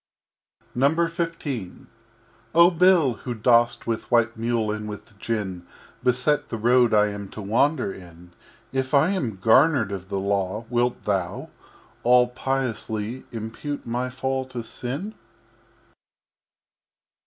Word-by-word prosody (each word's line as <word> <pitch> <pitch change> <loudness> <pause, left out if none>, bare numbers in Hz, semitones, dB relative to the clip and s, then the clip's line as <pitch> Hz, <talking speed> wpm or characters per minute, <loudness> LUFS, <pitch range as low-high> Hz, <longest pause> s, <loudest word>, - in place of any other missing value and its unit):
XV 165 +5 0 1.1
Oh 170 +2 +7
Bill, 175 -6 +4
Who 125 -2 -3
dost 120 +1 +3
with 115 -1 -3
White 120 -1 +3
Mule 115 -1 -1
and 105 0 -4
with 105 +1 -10
Gin 95 -7 -3 0.4
Beset 130 +4 +1
the 115 - -3
Road 120 +1 +4
I 105 -1 +4
am 100 -1 -7
to 110 - -8
Wander 120 +2 +1
in, 90 -1 -14 0.4
If 130 +1 0
I 155 +6 +4
am 130 - -2
garnered 115 - +4
of 95 -1 -6
the 100 - -2
Law, 100 +2 -1
wilt 120 0 0
Thou, 95 -4 -2 0.5
All 125 0 +5
piously, 125 -3 -3
Impute 115 +6 -5
my 125 +2 -2
Fall 130 +1 -2
to 125 -2 -6
Sin? 140 - -5
120 Hz, 120 wpm, -24 LUFS, 105-135 Hz, 1.1 s, Oh